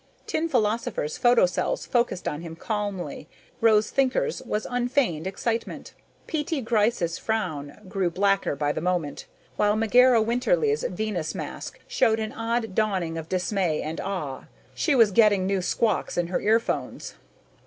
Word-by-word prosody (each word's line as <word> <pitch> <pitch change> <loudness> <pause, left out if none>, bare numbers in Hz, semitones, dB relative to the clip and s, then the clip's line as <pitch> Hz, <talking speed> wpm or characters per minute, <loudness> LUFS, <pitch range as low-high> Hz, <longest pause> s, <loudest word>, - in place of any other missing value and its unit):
Tin 330 +1 -1
Philosopher's 220 - 0
photocells 235 -8 +2
focused 235 -7 0
on 150 +1 -3
him 165 -1 -8
calmly, 205 -1 -4 0.3
Rose 220 -2 +4
Thinker's 275 - +1
with 210 +1 -3
unfeigned 245 - 0
excitement. 225 +4 -3 0.3
P.T. 315 0 -2
Gryce's 215 -7 +1
frown 160 -10 -3
grew 185 -1 0
blacker 195 -2 +1
by 145 +1 0
the 155 - -3
moment, 175 -4 -2 0.3
while 210 0 +3
Megera 245 +2 +5
Winterly's 430 - +1
Venus 210 - -3
mask - - -6
showed 235 - +2
an 220 -1 -3
odd 225 -2 -2
dawning 190 -6 0
of 160 -1 -6
dismay 185 -3 0
and 155 +2 -4
awe. 165 -9 -4 0.3
She 300 - +1
was 225 -5 +5
getting 205 -3 +4
new 195 0 0
squawks 220 +3 0
in 175 -1 0
her 180 - -1
earphones. 225 +2 0
210 Hz, 140 wpm, -25 LUFS, 180-235 Hz, 0.3 s, Megera